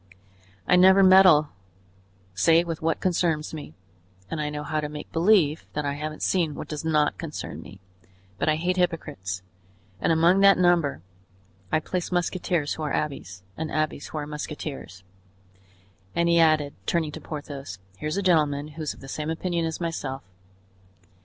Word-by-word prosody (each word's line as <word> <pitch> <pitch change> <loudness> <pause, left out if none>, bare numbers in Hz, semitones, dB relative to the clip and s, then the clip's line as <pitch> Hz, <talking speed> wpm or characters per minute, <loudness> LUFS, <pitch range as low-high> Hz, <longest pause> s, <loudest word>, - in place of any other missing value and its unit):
"I 180 - +5
never 190 +2 +7
meddle 185 -6 +7 0.8
save 165 - +4
with 165 -2 -5
what 160 0 0
concerns 165 -4 0
me, 150 -2 -8 0.6
and 160 - -2
I 150 - -1
know 150 0 -5
how 155 +1 -2
to 150 -1 -3
make 150 0 -8
believe 165 -3 +3
that 150 -1 -2
I 140 - -1
haven't 155 +1 -5
seen 165 -6 +1
what - - -7
does 150 -1 -5
not 155 -2 +1
concern 160 -3 -6
me; 100 - -13 0.6
but - - +1
I 155 - +3
hate 180 +3 -1
hypocrites, 95 - -2 0.6
and - - +1
among 170 +4 +4
that 195 0 +6
number 175 - +2 0.7
I 155 - +3
place 180 +2 -3
musketeers 175 -3 0
who - - -7
are 150 -2 -2
abbés 95 -11 -4
and 160 0 -4
abbés 155 -1 -2
who - - -6
are 150 - -3
musketeers; 145 - -7 1.1
and," 170 0 +2
he 170 0 +4
added, 155 -3 +3
turning 160 -3 0
to 160 - -9
Porthos 145 -9 -7 0.2
"here's 155 +4 -3
a 200 - -1
gentleman 150 -5 +2
who's 155 0 -5
of - - -17
the 135 - -10
same 150 +3 -4
opinion 170 +1 -1
as 160 - -5
myself." 145 -6 -4
155 Hz, 165 wpm, -25 LUFS, 150-170 Hz, 1.1 s, never